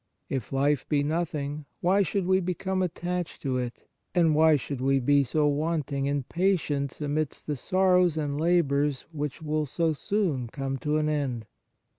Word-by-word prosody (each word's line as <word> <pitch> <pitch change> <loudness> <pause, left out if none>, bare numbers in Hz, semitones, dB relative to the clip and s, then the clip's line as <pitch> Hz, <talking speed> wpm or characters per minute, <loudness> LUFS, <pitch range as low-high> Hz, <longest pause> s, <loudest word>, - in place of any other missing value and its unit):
If 130 -6 -3
life 140 0 +1
be 145 -2 +2
nothing, 150 -2 -2
why 190 +3 +3
should 195 +1 0
we 185 +1 +3
become 185 +1 -2
attached 180 0 -3
to 130 -3 0
it, 120 -1 -6 0.3
and 165 -3 +4
why 160 +1 +5
should 140 -1 -4
we 135 +1 +3
be 140 +2 +4
so 150 +4 +1
wanting 145 -2 -1
in 140 -1 0
patience 155 -5 0
amidst 150 0 -2
the 150 - -2
sorrows 180 +2 +3
and 145 -1 -2
labours 150 -5 +2
which 150 0 -4
will 155 0 -1
so 165 +4 0
soon 155 - -1
come 135 +2 -4
to 150 +3 0
an 155 0 +1
end 135 -7 -1
150 Hz, 165 wpm, -27 LUFS, 140-170 Hz, 0.3 s, why